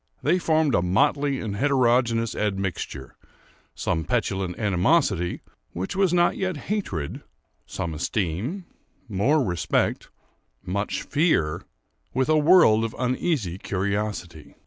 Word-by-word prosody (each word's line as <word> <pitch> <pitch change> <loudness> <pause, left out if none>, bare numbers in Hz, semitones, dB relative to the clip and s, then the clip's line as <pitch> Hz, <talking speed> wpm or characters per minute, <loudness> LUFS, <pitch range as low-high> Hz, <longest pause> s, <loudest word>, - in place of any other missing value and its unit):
They 175 +5 +3
formed 160 -4 +2
a - - +3
motley 135 - +1
and 105 -3 -4
heterogeneous 120 -3 +2
admixture;—some 95 -3 -5
petulant 95 +3 -1
animosity, 95 - +1 0.3
which 95 +2 -4
was 190 -2 +2
not 175 0 +3
yet 185 -4 -2 0.2
hatred, 90 - -3 0.5
some 85 - -4
esteem, 100 - -2 0.4
more 125 +9 +2
respect, 90 -8 -1 0.6
much 100 +3 -2
fear, 145 - +1 0.5
with 130 +2 +1
a 155 - +4
world 150 -9 +6
of 115 0 -3
uneasy 125 - -1
curiosity. 100 -5 -3
110 Hz, 105 wpm, -24 LUFS, 90-150 Hz, 0.6 s, world